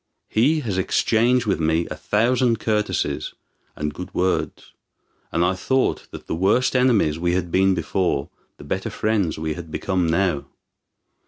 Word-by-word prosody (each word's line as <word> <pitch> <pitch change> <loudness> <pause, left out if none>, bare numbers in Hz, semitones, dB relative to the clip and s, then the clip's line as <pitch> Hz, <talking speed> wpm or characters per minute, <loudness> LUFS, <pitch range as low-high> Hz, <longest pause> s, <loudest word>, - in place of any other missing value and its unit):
He 145 +8 +2
has 100 -8 -2
exchanged 120 +6 +2
with 95 -6 0
me 80 +1 +1
a - - -3
thousand 115 - +1
courtesies 105 -1 -1 0.4
and 75 0 -3
good 90 +3 -8
words; 90 +1 -1 0.6
and 85 +1 +2
I 90 - +2
thought 130 +8 0
that - - -10
the - - -4
worse 100 +9 +2
enemies 115 -12 +3
we 85 0 +1
had 90 -2 -1
been 95 0 +3
before, 90 -8 -1 0.3
the - - -12
better - - -3
friends 105 -7 0
we 80 0 -2
had 85 +1 -9
become 90 +1 -1
now. 85 -3 +1
95 Hz, 155 wpm, -22 LUFS, 85-110 Hz, 0.6 s, enemies